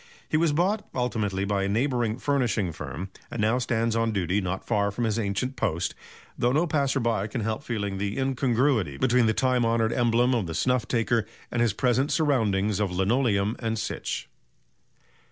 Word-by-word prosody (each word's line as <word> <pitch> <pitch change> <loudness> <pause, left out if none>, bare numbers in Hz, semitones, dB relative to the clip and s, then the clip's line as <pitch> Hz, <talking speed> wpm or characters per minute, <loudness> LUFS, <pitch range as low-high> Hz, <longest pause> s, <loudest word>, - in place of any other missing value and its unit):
He - - -2
was 160 0 +3
bought 190 +8 0
ultimately 110 -6 -1
by 100 -1 0
a 100 - 0
neighbouring 120 0 0
furnishing 125 -10 0
firm, 90 +4 -6 0.2
and 120 - -6
now 110 +4 +2
stands 115 -2 0
on 115 0 +1
duty 95 0 0
not 95 0 -3
far 100 -3 +1
from 105 +4 -3
his 110 0 0
ancient 110 +5 -2
post, 85 -8 -1 0.4
though 120 - +1
no 155 +6 +2
passer 140 -4 +1
by 115 -4 0
can 110 +2 -4
help 110 +2 -2
feeling 105 -8 -3
the 100 +3 -2
incongruity 130 - +1
between 125 - +3
the 110 - +3
time 130 -2 +2
honoured 115 0 +1
emblem 120 +1 +2
of 115 -7 0
the 80 - -5
snuff 125 +5 +1
taker 115 -2 +1 0.2
and 120 - 0
his 115 -4 +2
present 130 +6 +1
surroundings 105 - +1
of 105 -2 +1
linoleum 100 +2 +1
"and 115 -2 -2
sich." - - -4
115 Hz, 180 wpm, -26 LUFS, 100-125 Hz, 0.4 s, was